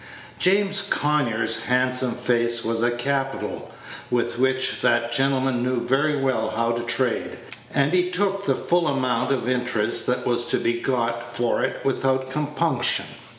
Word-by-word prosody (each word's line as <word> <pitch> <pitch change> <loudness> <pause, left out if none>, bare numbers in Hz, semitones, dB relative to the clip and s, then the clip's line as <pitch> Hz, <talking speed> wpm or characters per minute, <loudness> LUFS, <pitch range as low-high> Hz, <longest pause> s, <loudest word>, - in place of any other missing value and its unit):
James 195 +1 +3
Conyers' 140 - 0
handsome 125 0 +1
face 120 -1 0
was 115 0 -1
a 120 - +3
capital 135 +3 -2 0.4
with 120 -1 -1
which 130 0 +1
that 120 0 +2
gentleman 135 -1 +1
knew 125 0 0
very 135 +5 +1
well 130 -5 0
how 115 +1 +1
to 120 0 -2
trade, 120 +1 -1 0.3
and 140 +4 +1
he 180 0 +2
took 195 +1 -1
the - - +2
full 175 -1 0
amount 130 -2 0
of 130 -3 -1
interest 120 -3 0
that 125 - -1
was 120 -1 +1
to - - +1
be 120 0 -1
got 120 -2 -2
for 120 -1 0
it - - -3
without 130 -1 0
compunction. 150 -2 0
125 Hz, 150 wpm, -23 LUFS, 120-140 Hz, 0.4 s, James